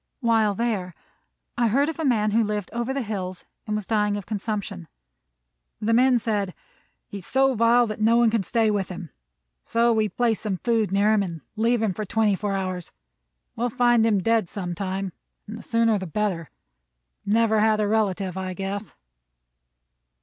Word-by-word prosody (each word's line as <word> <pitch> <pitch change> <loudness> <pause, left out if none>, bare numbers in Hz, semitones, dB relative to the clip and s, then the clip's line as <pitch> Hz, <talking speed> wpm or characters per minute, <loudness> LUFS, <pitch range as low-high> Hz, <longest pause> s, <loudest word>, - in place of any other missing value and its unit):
While 225 -4 +2
there 200 -6 -2 0.6
I 240 - +4
heard 275 +7 +2
of 320 0 -4
a - - -1
man 220 -6 +2
who 225 +2 +3
lived 210 -2 -3
over 235 +2 -2
the 270 -1 -2
hills 185 -4 -5 0.2
and 210 - -1
was 210 -2 -3
dying 210 -1 +1
of 200 - -7
consumption. 205 -4 -4 0.9
The 220 +2 0
men 250 +1 +5
said: 205 -5 -2 0.5
"He 200 - -8
is 180 - -8
so 270 0 +3
vile 235 +1 +4
that 215 -1 -5
no 230 +2 +4
one 235 -2 +4
can 225 -2 +1
stay 220 +3 +1
with 200 -3 -1
him; 180 -3 -8 0.5
so 235 0 +2
we 215 -1 +1
place 235 -1 0
some 205 -4 -2
food 225 -2 0
near 205 +2 +3
him, 215 - +3
and 170 -5 -5
leave 230 +1 +1
him 210 -4 +1
for 215 - -4
twenty 210 0 +1
four 200 +1 -2
hours. 185 -3 -3 0.6
We - - -7
will 245 - +1
find 240 -1 +3
him 210 -4 +2
dead 225 -5 +2
sometime, 190 0 -4 0.3
and 215 - -8
the 225 - -8
sooner 230 -2 +2
the 190 - -5
better. 180 -3 -2 0.7
Never 220 +1 +2
had 215 0 +3
a 210 - +1
relative, 200 -4 0
I 185 -1 -4
guess." 195 +2 -5
215 Hz, 185 wpm, -24 LUFS, 195-230 Hz, 0.9 s, men